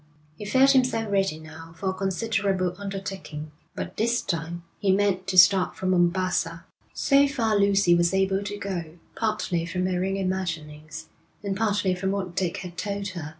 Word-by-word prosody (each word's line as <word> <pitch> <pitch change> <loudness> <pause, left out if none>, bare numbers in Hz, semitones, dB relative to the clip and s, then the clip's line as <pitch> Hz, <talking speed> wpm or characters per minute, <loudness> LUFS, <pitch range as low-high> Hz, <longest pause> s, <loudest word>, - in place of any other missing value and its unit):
He 205 - -8
felt 265 +6 +5
himself 250 -5 +2
ready 195 -5 +1
now 160 +1 -12
for 190 +3 -1
a - - -5
considerable 195 -1 -1
undertaking; 195 -6 -6 0.2
but - - -6
this 235 +2 +1
time 170 +1 -3 0.2
he 200 -2 +2
meant 190 -1 +1
to 190 -1 -1
start 185 +1 +6
from 185 0 -1
Mombassa. 175 -2 +1 0.3
So 280 0 +4
far 230 -6 0
Lucy 200 -3 +4
was 170 0 +3
able 190 0 +1
to 205 0 -4
go, 175 -5 -5 0.2
partly 215 -6 -1
from 180 +1 -2
her 180 -1 0
own 195 +1 -1
imaginings, 165 -5 -4 0.4
and 200 -1 -2
partly 205 -3 +1
from 185 +1 -2
what 190 -3 -3
Dick 180 -3 -1
had 175 -1 -8
told 200 0 -3
her. 170 -5 -6
190 Hz, 170 wpm, -25 LUFS, 175-200 Hz, 0.4 s, start